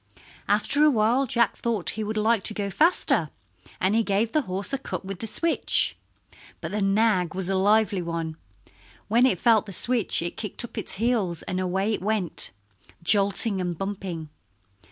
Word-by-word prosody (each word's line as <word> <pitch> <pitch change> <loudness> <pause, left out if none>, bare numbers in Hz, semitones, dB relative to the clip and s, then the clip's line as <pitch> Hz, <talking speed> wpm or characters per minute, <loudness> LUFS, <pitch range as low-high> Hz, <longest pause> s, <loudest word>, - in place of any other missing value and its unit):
After 290 +1 +2
awhile 255 -1 +3
Jack 235 -1 +1
thought 225 -6 -1
he 220 - -4
would 215 +1 -3
like 220 0 +2
to 215 - +1
go 200 -1 -3
faster, 300 - +2 0.5
and 190 +2 +1
he 225 - +3
gave 215 +1 0
the 310 - +2
horse 195 +8 -4
a 275 - 0
cut - - -6
with 195 -1 -6
the 225 - -3
switch. 330 +9 +2 0.6
But - - -6
the 210 +1 -2
nag 195 -3 +2
was 190 -1 -1
a 195 - 0
lively 205 0 +2
one. 165 -2 -4 0.7
When 240 +4 +4
it 190 -9 0
felt 220 -3 +3
the 195 - -8
switch 235 -3 0
it 170 - -5
kicked 210 +2 -3
up - - -13
its - - -4
heels, 205 -6 -1
and 185 0 -3
away 190 +4 0
it - - -3
went, 205 -3 -2 0.5
jolting 200 +2 +3
and 175 -2 -3
bumping. 190 -5 -5
205 Hz, 175 wpm, -25 LUFS, 185-225 Hz, 0.7 s, When